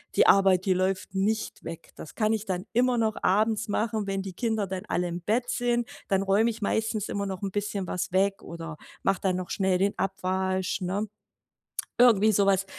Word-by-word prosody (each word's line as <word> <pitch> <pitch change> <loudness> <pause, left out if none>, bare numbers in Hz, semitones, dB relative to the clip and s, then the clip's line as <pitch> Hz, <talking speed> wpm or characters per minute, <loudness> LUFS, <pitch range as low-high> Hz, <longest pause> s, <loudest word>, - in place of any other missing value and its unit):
„die - - +5
Arbeit, 190 -1 +5
die 190 - +3
läuft 185 +1 -1
nicht 210 +3 -1
weg.“ 165 - -8
Das 155 - -10
kann 215 0 +2
ich 220 -1 -2
dann 185 0 -3
immer 245 +1 +3
noch 220 -1 +1
abends 215 +3 +2
machen, 215 0 -1
wenn 195 0 -2
die 190 -2 -6
Kinder 220 -1 -1
dann 190 +1 -5
alle 180 0 0
im 175 0 -5
Bett 240 +6 0
sind. 240 -1 0 0.2
Dann 195 0 +2
räume 200 +4 +3
ich 225 -1 -5
meistens 220 0 -1
immer 200 0 -2
noch 190 0 -5
'n 195 - -2
bisschen 205 -1 -2
was 180 0 -3
weg 195 +2 +1
oder 165 -2 -7 0.3
mache 195 - +1
dann 185 -2 +1
noch 180 -1 -4
schnell 190 -2 +1
den 200 +2 +1
Abwasch, 190 0 -1
ne? 195 +4 -1 0.9
Irgendwie 220 -3 +6
so 200 +1 +3
was 195 0 +3
195 Hz, 200 wpm, -27 LUFS, 185-220 Hz, 0.9 s, Irgendwie